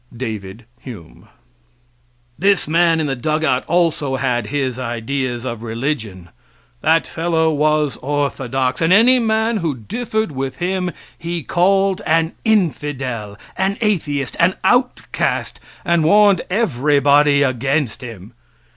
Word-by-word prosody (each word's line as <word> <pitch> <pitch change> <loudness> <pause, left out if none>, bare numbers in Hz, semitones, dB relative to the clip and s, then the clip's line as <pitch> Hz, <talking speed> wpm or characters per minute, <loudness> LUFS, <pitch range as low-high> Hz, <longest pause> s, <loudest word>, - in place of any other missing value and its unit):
David 110 -3 -6
Hume] 105 -12 -12 1.1
This 195 -4 +2
man 165 +1 +3
in 155 - 0
the 135 -2 -1
dugout 155 0 0
also 160 -6 +1
had 125 -4 -1
his 130 -2 -2
ideas 120 +1 -3
of 115 -3 -5
religion 115 - -4 0.5
that 165 0 +3
fellow 160 -1 0
was 150 -1 +1
orthodox, 135 -2 -1
and 165 +2 +2
any 240 +6 +6
man 220 0 +1
who 165 -7 -2
differed 220 - -3
with 135 -1 -4
him 180 0 -2 0.3
he 170 -1 -5
called 195 +3 +2
an 160 +1 +2
infidel, 135 - -1 0.2
an 190 +1 -1
atheist, 150 - -1
an 175 +3 +3
outcast, 250 0 0 0.3
and 170 -2 +2
warned 200 +2 +5
everybody 145 - +3
against 135 0 -1
him. 110 -5 -10
150 Hz, 120 wpm, -18 LUFS, 130-175 Hz, 1.1 s, any